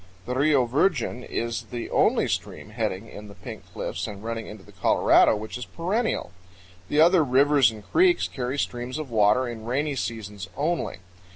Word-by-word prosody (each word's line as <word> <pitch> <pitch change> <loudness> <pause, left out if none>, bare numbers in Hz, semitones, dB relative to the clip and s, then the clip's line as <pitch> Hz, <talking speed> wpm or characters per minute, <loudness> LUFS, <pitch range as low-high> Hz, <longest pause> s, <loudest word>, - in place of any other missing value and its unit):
The 125 - -3
Rio 140 -1 +3
Virgen 125 -2 0
is 115 -1 -3
the 120 -1 -5
only - - +3
stream - - -4
heading 95 +4 -3
in 105 -1 -10
the 100 - -12
Pink - - -10
Cliffs 95 +5 -4
and 105 -1 -8
running 115 -1 -4
into 105 -2 -10
the - - -16
Colorado - - +4
which 110 +3 -6
is 125 - -5
perennial. 200 - -2 0.6
The 150 - +1
other 170 +1 +6
rivers 140 -1 +4
and 110 -2 -10
creeks 355 +1 +3
carry 130 +1 -4
streams 125 0 -3
of 155 -5 -6
water 110 +3 +3
in 115 -2 -7
rainy 140 +4 -1
seasons 105 -6 -5
only. 155 - -1
125 Hz, 175 wpm, -25 LUFS, 110-145 Hz, 0.6 s, other